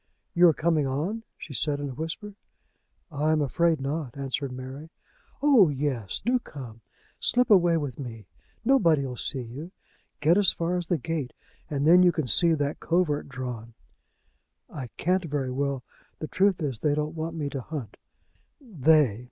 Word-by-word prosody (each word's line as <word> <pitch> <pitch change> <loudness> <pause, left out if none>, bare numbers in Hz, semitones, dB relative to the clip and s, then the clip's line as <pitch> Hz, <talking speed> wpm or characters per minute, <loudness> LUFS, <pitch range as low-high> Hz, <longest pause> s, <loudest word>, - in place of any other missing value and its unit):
"You 175 +1 +6
are 165 - +5
coming 155 -3 +1
on?" 160 +12 -2 0.2
she 145 - -9
said 145 +2 0
in 145 -1 -4
a - - -7
whisper. 165 - -6 0.8
"I 150 +1 0
am 155 - +2
afraid 160 +3 +1
not," 140 -1 -4
answered 135 0 -3
Mary. 130 +5 -8 0.5
"Oh, 255 - +6
yes; 135 -8 -2
do 250 +2 +1
come. 125 - -10 0.4
Slip 250 -2 +2
away 175 -4 +5
with 145 -5 -4
me. 115 -6 -7 0.4
Nobody'll 165 - +3
see 130 +2 -3
you. 140 +9 -8 0.5
Get 165 +6 +4
as 200 - +4
far 170 +1 -1
as 175 -2 -3
the 175 - +1
gate, 150 -3 -4 0.4
and 145 -1 -1
then 175 +3 +7
you 180 -1 +6
can 155 -3 -2
see 165 +6 +5
that 145 0 -2
covert 165 -5 0
drawn." 125 -3 -6 1.0
"I 130 -4 -6
can't 185 +1 +1
very 140 -4 -2
well. 135 -1 -2 0.3
The 155 - -5
truth 190 -1 +2
is, 135 -6 -2
they 145 +3 +1
don't 150 +1 -2
want 165 +1 -4
me 150 -3 -2
to 135 - -4
hunt." 140 -4 -7 0.6
"They! 155 - +3
150 Hz, 170 wpm, -26 LUFS, 135-170 Hz, 1.0 s, then